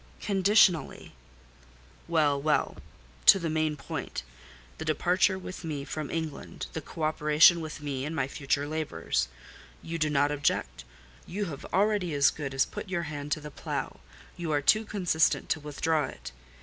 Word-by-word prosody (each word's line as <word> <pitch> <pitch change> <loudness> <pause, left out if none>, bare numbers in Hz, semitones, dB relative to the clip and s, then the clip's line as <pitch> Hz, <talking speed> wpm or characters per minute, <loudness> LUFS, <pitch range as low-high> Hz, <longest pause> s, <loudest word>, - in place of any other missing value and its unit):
"Conditionally." 195 -4 +3 1.0
"Well—well. 150 -2 +1 0.5
To 195 - +10
the 165 -4 -2
main 155 -1 0
point—the 65 - -8
departure 180 +5 +2
with 185 -1 -8
me 150 -4 -4
from 155 -2 -5
England, 160 -3 -5
the 160 - -4
co 160 - -7
operation 155 +2 +5
with 155 -1 -7
me 135 -3 -3
in 155 +3 -4
my 135 -5 0
future 140 +1 -1
labours—you 65 - -4
do 155 -1 +2
not 145 0 +2
object. 140 - -1 0.4
You 205 +4 -3
have 140 - -9
already 195 -5 +1
as 140 -1 +5
good 135 -3 -5
as 135 - +3
put - - -7
your 175 -2 -1
hand 145 -2 -6
to 155 - -4
the 150 0 -8
plough: - - -4 0.4
you 170 -3 -4
are 145 -1 +2
too 215 +8 +4
consistent 180 -6 +1
to - - +1
withdraw 150 +1 0
it. 60 +1 -9
155 Hz, 150 wpm, -28 LUFS, 140-170 Hz, 1.0 s, To